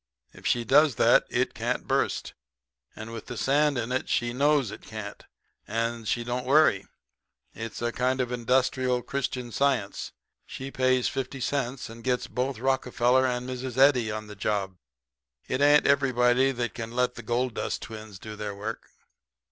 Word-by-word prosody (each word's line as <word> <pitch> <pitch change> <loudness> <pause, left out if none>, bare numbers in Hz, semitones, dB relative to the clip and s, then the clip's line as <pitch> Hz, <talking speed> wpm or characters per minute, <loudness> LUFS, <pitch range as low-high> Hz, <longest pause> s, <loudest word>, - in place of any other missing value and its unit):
If - - -6
she 120 - +2
does 140 +3 +5
that - - +4
it - - 0
can't - - -2
burst. - - 0 0.6
And 110 +1 -8
with 115 - -8
the 125 - -6
sand 145 +2 +2
in 120 +1 -2
it 130 - -1
she 120 0 0
knows 140 -3 +2
it - - -9
can't, 110 -2 -8 0.4
and 115 0 -2
she 120 - 0
don't 125 +1 -3
worry. 145 -8 +4 0.7
It's 115 +1 -6
a 120 - 0
kind 130 +2 0
of 125 -1 -1
Industrial 125 +1 +1
Christian 125 -2 -3
Science. 130 -6 0 0.4
She 135 +1 -7
pays 130 -1 +2
fifty 135 0 -4
cents, 130 -1 -2
and 115 0 -11
gets 125 -1 0
both 130 0 -2
Rockefeller 130 0 +2
and 125 0 -2
Mrs. 130 -1 -5
Eddy 130 -4 +5
on 110 0 -4
the 105 0 -10
job. 100 -2 -2 0.7
It 130 - -1
ain't 145 +1 +6
everybody 130 -2 +3
that 120 -2 -3
can 115 0 -6
let 125 0 +1
the 120 - -8
gold 120 +2 -1
dust - - -3
twins 110 -3 -9
do 110 +3 -8
their 105 -1 -5
work.' 110 +3 -6
125 Hz, 170 wpm, -27 LUFS, 115-130 Hz, 0.7 s, ain't